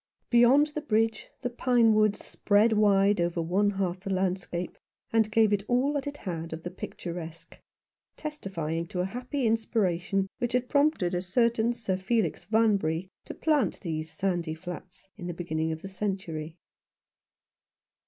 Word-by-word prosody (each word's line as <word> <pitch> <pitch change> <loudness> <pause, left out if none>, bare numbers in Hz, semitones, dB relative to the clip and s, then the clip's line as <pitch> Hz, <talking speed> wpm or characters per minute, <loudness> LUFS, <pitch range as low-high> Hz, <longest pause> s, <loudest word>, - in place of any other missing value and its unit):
Beyond 260 +5 +6
the 300 - -3
bridge, 225 -5 0
the 245 - 0
pine 240 -2 +3
woods 215 -1 +2
spread 215 +2 +3
wide 200 -2 +4
over 170 0 0
one 185 +5 +2
half 190 -2 -2
the 195 - -7
landscape, 185 -2 -2 0.3
and 220 -1 +3
gave 220 -1 +4
it 200 -1 +1
all 255 +4 +2
that 285 -1 -2
it 285 0 -5
had 165 - -5
of 160 0 -7
the 175 - -5
picturesque, 170 -2 -7 0.6
testifying 170 - -4
to 180 - -7
the 180 - +1
happy 250 +6 -3
inspiration 195 -4 +1
which 240 -2 -1
had 250 0 +1
prompted 285 - +2
a 180 - 0
certain 230 +4 +2
Sir 220 -6 -2
Felix 190 -2 0
Vanbury 200 -6 +1 0.2
to - - -7
plant 305 -4 +1
these 160 -3 -4
sandy 175 -5 -1
flats 180 +2 -9
in 175 -4 -6
the 175 - -4
beginning 160 -2 -2
of 160 +1 -6
the - - -5
century. 185 -5 -4
195 Hz, 155 wpm, -28 LUFS, 175-230 Hz, 0.6 s, Beyond